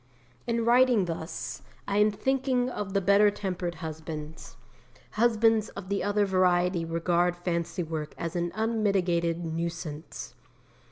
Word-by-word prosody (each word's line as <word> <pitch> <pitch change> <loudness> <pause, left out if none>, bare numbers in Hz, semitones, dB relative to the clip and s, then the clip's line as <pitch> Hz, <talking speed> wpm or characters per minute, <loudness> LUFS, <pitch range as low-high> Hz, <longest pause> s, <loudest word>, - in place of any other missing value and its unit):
In 230 -1 0
writing 240 -4 +5
thus, 165 -4 -5 0.3
I 200 +1 +1
am 210 +1 +5
thinking 255 +2 0
of 205 -4 -4
the 200 - +3
better 200 +2 +5
tempered 180 -4 -3
husbands. 155 -2 -7 0.5
Husbands 225 -1 +3
of 195 -1 -7
the 200 - 0
other 205 0 +2
variety 180 -2 +2
regard 170 +1 +1
fancy 175 0 -2
work 155 -2 -5
as 170 +1 -4
an 175 0 -1
unmitigated 185 -7 +1
nuisance. 160 -5 -5
180 Hz, 125 wpm, -28 LUFS, 170-210 Hz, 0.5 s, writing